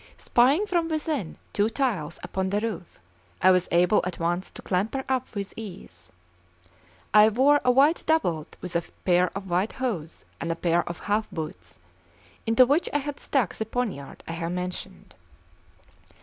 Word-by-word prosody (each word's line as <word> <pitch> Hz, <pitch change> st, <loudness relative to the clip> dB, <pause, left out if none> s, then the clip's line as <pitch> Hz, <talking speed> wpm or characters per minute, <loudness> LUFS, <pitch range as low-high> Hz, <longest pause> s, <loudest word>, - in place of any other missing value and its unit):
Spying 275 Hz, +11 st, +3 dB
from 345 Hz, -5 st, 0 dB
within 305 Hz, -, -2 dB, 0.2 s
two 210 Hz, +2 st, +2 dB
tiles 215 Hz, -, -1 dB
upon 190 Hz, 0 st, -2 dB
the 205 Hz, +2 st, +1 dB
roof, 205 Hz, -6 st, -5 dB, 0.4 s
I 185 Hz, -, +6 dB
was 180 Hz, -1 st, +3 dB
able 180 Hz, +5 st, +4 dB
at 180 Hz, -1 st, -4 dB
once 175 Hz, +2 st, -1 dB
to -, -, -11 dB
clamber 210 Hz, +8 st, -1 dB
up 260 Hz, -3 st, -2 dB
with 200 Hz, -1 st, -4 dB
ease. 95 Hz, -, -10 dB, 1.0 s
I 215 Hz, 0 st, +8 dB
wore 275 Hz, +6 st, +4 dB
a 250 Hz, -, +3 dB
white 280 Hz, +6 st, +4 dB
doublet 175 Hz, -, 0 dB
with 180 Hz, -2 st, -5 dB
a 170 Hz, -, +3 dB, 0.2 s
pair 180 Hz, 0 st, +4 dB
of 195 Hz, -1 st, -7 dB
white 180 Hz, +4 st, 0 dB
hose 205 Hz, -12 st, -4 dB
and 165 Hz, -, -2 dB
a -, -, -1 dB
pair 170 Hz, 0 st, +2 dB
of 170 Hz, -, -6 dB
half 210 Hz, +1 st, 0 dB
boots, 95 Hz, -, -7 dB, 0.7 s
into 230 Hz, +3 st, +6 dB
which 290 Hz, +7 st, +2 dB
I -, -, +2 dB
had 290 Hz, 0 st, -5 dB
stuck 250 Hz, -, 0 dB
the -, -, -3 dB
poniard 220 Hz, -, -4 dB
I -, -, -4 dB
have 165 Hz, +1 st, -3 dB
mentioned. 180 Hz, 0 st, -6 dB
200 Hz, 165 wpm, -26 LUFS, 175-255 Hz, 1.0 s, I